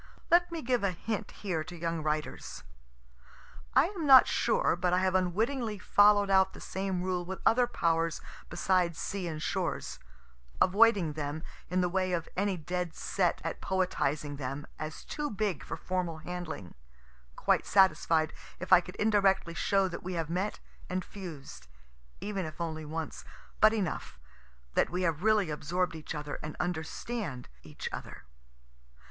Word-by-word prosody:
(Let 350 +1 +5
me 330 -2 -4
give 245 -2 +1
a 200 - +3
hint 205 +4 -4
here 180 -6 -3
to 175 +2 -9
young 165 -1 -2
writers. 155 0 -3 1.1
I - - +7
am 355 -7 -4
not 265 -1 +10
sure - - +2
but 180 -2 0
I - - +4
have 185 0 +2
unwittingly 215 +5 0
follow'd 205 +1 +5
out 190 0 +4
the - - -10
same 190 -2 -3
rule 180 -1 -1
with 190 +2 -5
other 245 +1 +5
powers 165 -6 0 0.3
besides 175 -1 +1
sea 190 +1 -3
and 155 -2 -4
shores 60 - -2 0.6
avoiding 195 -4 +4
them, 150 +1 -4 0.3
in 185 +1 +1
the 180 - +2
way 185 0 0
of 165 -2 -1
any 195 0 0
dead 175 +1 -3
set 180 -3 0
at 165 - -4
poetizing 150 -6 -1
them, 140 +2 -4
as 155 0 -6
too 295 -1 -3
big 200 - -2
for - - -5
formal 180 -3 -2
handling 165 - -6 0.6
quite - - +1
satisfied 165 -5 +4 0.3
if 185 - +1
I 175 - +9
could 180 - -10
indirectly 195 -5 +2
show 195 +3 +2
that 175 - -6
we 185 +1 -5
have 165 -2 -2
met 190 +4 -1 0.3
and 185 0 -2
fused, 150 - -9 0.5
even 200 -2 -3
if 155 - -10
only 160 -2 -3
once, 160 +1 -5 0.4
but 215 - +7
enough 195 - -3 0.6
that - - +2
we 180 +1 -2
have 165 -3 0
really 210 -5 +3
absorb'd 175 +5 -1
each 160 0 -6
other 150 -1 -5
and 155 0 -6
understand 175 - -3
each 75 +1 -7
other.) 65 - -7
180 Hz, 160 wpm, -30 LUFS, 160-200 Hz, 1.1 s, not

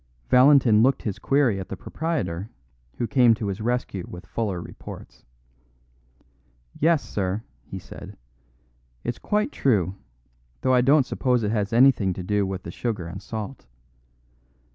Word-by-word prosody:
Valentin 125 -4 +6
looked 130 +3 +3
his 105 -4 -3
query 135 -8 +2
at 95 - -7
the 95 - -5
proprietor, 105 - -3 0.5
who 120 - -1
came 120 -2 +4
to 110 - -4
his 95 +2 -4
rescue 120 -5 -2
with 90 +2 -9
fuller 100 -6 -2
reports. 85 - -11 1.5
"Yes, 160 -1 +2
sir," 100 +2 -2 0.2
he - - -6
said, - - -10 0.9
"it's 120 0 -3
quite 210 +7 0
true, 95 -9 +1 0.7
though 130 - +2
I 125 - +5
don't 135 +2 +4
suppose 125 -3 0
it 105 - 0
has 105 -1 -1
anything 115 -6 +4
to 90 - -6
do 100 +1 0
with 95 -1 -5
the 85 - -7
sugar 105 -3 -3
and 85 - -7
salt. 110 - -7
115 Hz, 145 wpm, -24 LUFS, 95-130 Hz, 1.5 s, Valentin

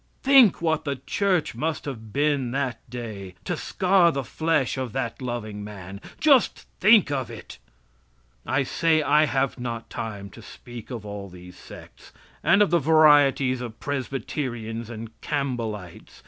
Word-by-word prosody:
Think 260 -10 +6
what 160 -1 +1
the 140 -2 -2
Church 185 +3 0
must 155 +7 -3
have 110 -6 -7
been 140 -2 +1
that 130 -2 -2
day 110 -6 -7
to - - -1
scar 185 -2 +3
the 140 -3 -3
flesh 160 0 0
of 130 -4 -4
that 130 -1 -3
loving 110 -4 -5
man! 100 -1 -9 0.2
Just 275 -6 +3
think 210 -5 +6
of 130 -4 -2
it! 115 -2 -10 0.8
I 135 +1 0
say 155 +3 +1
I 150 +1 +4
have 135 -1 -1
not 120 -2 -5
time 100 -3 -6
to - - -13
speak 120 -2 -11
of 115 -4 -6
all 100 -1 -7
these 90 0 -13
sects. - - -14 0.3
And 205 +1 +5
of 200 - -1
the 170 - +4
varieties 145 -4 +4
of 115 -2 -7
Presbyterians 120 -4 -4
and 115 -1 -7
Campbellites. 115 - -4
130 Hz, 150 wpm, -25 LUFS, 110-150 Hz, 0.8 s, Think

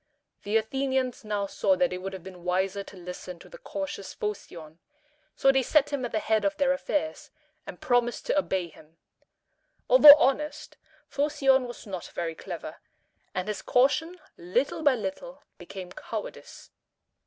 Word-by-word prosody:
The 210 +2 +1
Athenians 260 +2 -1
now 210 -2 -2
saw 280 +7 +1
that 270 -5 +1
it 180 - -4
would 195 +1 -6
have 190 -3 -8
been 180 -2 -11
wiser 190 +2 0
to 195 - -13
listen 180 0 -8
to - - -15
the - - -13
cautious 290 - -6
Phocion: 170 -6 -6 0.6
so 270 - +4
they 270 0 +2
set 290 +2 +2
him 275 -2 -1
at 245 - -3
the - - 0
head 220 0 +1
of 300 0 0
their 275 -2 +3
affairs, 300 +3 -3 0.4
and - - -8
promised 245 -1 0
to 295 - +2
obey 190 -10 -1
him. 160 +1 -19 0.9
Although 300 -13 +11
honest, 300 +2 -1 0.3
Phocion 275 -3 +2
was 240 - -10
not 185 -4 -6
very 165 -1 -2
clever, - - -8 0.6
and 185 +2 -2
his 210 - -3
caution 320 +8 +2 0.2
little 250 - -1
by 285 -4 +4
little 260 +7 -6 0.2
became 185 0 -9
cowardice. - - -8
245 Hz, 160 wpm, -27 LUFS, 190-285 Hz, 0.9 s, Although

